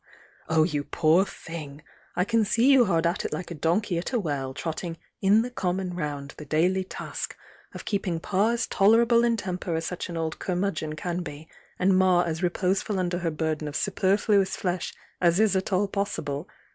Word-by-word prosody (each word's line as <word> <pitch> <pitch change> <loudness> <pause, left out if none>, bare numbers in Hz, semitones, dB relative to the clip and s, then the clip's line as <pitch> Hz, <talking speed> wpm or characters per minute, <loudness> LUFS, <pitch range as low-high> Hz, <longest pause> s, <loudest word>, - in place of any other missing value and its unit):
Oh, 160 -1 +4
you 150 -3 -1
poor 165 +5 +3
thing! 155 -6 -8 0.3
I 180 - +2
can 230 +1 +2
see 235 +6 +3
you 260 -3 +6
hard 170 -4 +1
at 170 +1 0
it - - -3
like 180 - -5
a - - -2
donkey 170 +4 0
at 175 - -4
a 245 - +2
well, 140 -8 -2
trotting 165 +4 -4 0.2
'in 205 +3 +5
the 250 - -5
common 185 -4 -2
round, 145 -4 -4
the 150 - -8
daily 180 +6 +2
task' 185 - -6 0.4
of - - -8
keeping 195 -5 -1
Pa 195 +5 +1
as 235 0 0
tolerable 230 +4 +4
in 235 -1 +2
temper 180 -4 -3
as 165 0 -2
such 180 +1 -4
an 170 - -4
old 160 -1 -3
curmudgeon 175 -4 -2
can 175 +2 -3
be, 150 -1 -8 0.3
and 190 +1 +3
Ma 185 -1 +4
as 165 -1 -3
reposeful 190 +3 0
under 175 -1 -1
her 170 -2 -1
burden 155 -1 -2
of 145 - -6
superfluous 200 0 +2
flesh 180 -1 -2 0.3
as 175 +1 +4
is 215 -3 +4
at 190 +1 -1
all 195 +2 +2
possible. 180 -6 -3
180 Hz, 195 wpm, -26 LUFS, 160-195 Hz, 0.4 s, you